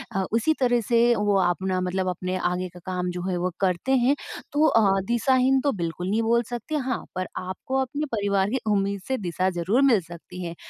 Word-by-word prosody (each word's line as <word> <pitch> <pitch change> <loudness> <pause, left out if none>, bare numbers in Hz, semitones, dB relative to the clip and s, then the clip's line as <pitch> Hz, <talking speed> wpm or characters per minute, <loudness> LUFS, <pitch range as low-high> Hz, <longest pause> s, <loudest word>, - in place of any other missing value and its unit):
अ, 190 - +1
उसी 235 +8 +3
तरह 245 -2 +3
से 235 +1 +3
वो 205 -1 +1
अपना 185 +1 0
मतलब 185 +1 -1
अपने 185 +1 -3
आगे 180 0 -1
का 180 - -11
काम 180 -1 -2
जो 180 0 -5
है 180 - -1
वो 180 +1 -1
करते 185 +7 0
हैं। 255 +4 +3 0.4
तो 300 +2 +4
अ, 200 -7 +4
दिशाहीन 260 +3 +3
तो 285 - +1
बिल्कुल 170 +2 -3
नहीं 220 +3 +1
बोल 235 +1 +2
सकते 240 +6 -4
हाँ, 260 -3 -2
पर 185 0 -2
आपको 185 +8 -4
अपने 285 +4 -2
परिवार 200 -1 +1
की 260 +2 -1
उम्मीद 200 -1 0
से 265 0 0
दिशा 185 0 -1
ज़रूर 205 +10 +2
मिल 210 -5 +4
सकती 175 +2 -10
है 170 0 -5
200 Hz, 210 wpm, -25 LUFS, 185-245 Hz, 0.4 s, तो